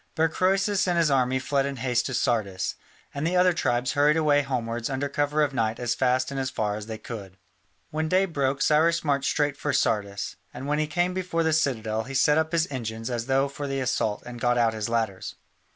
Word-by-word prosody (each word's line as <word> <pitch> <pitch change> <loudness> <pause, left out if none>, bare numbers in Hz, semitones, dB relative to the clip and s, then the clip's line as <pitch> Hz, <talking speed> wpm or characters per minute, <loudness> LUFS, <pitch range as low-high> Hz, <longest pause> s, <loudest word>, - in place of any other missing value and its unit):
But 160 0 +2
Croesus 195 +2 +1
and 175 -1 +1
his 165 -3 +3
army 130 -1 +2
fled 135 +1 0
in 140 - -4
haste 125 -1 0
to 130 - -3
Sardis, 100 -6 0 0.4
and 140 - -4
the 180 - 0
other 180 0 +5
tribes 125 -5 0
hurried 145 +2 +3
away 150 -2 +3
homewards 120 -3 -3
under 135 +1 -1
cover 145 +1 +1
of 145 -2 -1
night 115 -3 0
as 120 -1 0
fast 130 +1 +1
and 135 - -3
as 130 -1 -1
far 105 -4 -2
as 105 0 -7
they 110 -1 -5
could. 100 -5 -8 0.5
When 155 +1 -1
day 185 +2 +3
broke 140 -5 -1
Cyrus 165 +2 +3
marched 140 -2 +1
straight 145 -2 +1
for 145 - -2
Sardis, 100 -2 -1 0.2
and 135 - -6
when 150 +1 0
he 155 - 0
came 175 +4 0
before 180 -3 -1
the 160 -1 +1
citadel 115 -8 0
he 135 +1 -7
set 150 +3 +4
up 160 0 -1
his 170 -1 +2
engines 115 -2 -4
as 120 0 -3
though 135 +1 +2
for 140 +1 -6
the 135 0 -2
assault 125 -5 -1
and 120 -1 -8
got 120 0 +2
out 115 -2 +3
his 110 0 -3
ladders. 110 -5 -2
135 Hz, 225 wpm, -26 LUFS, 115-155 Hz, 0.5 s, other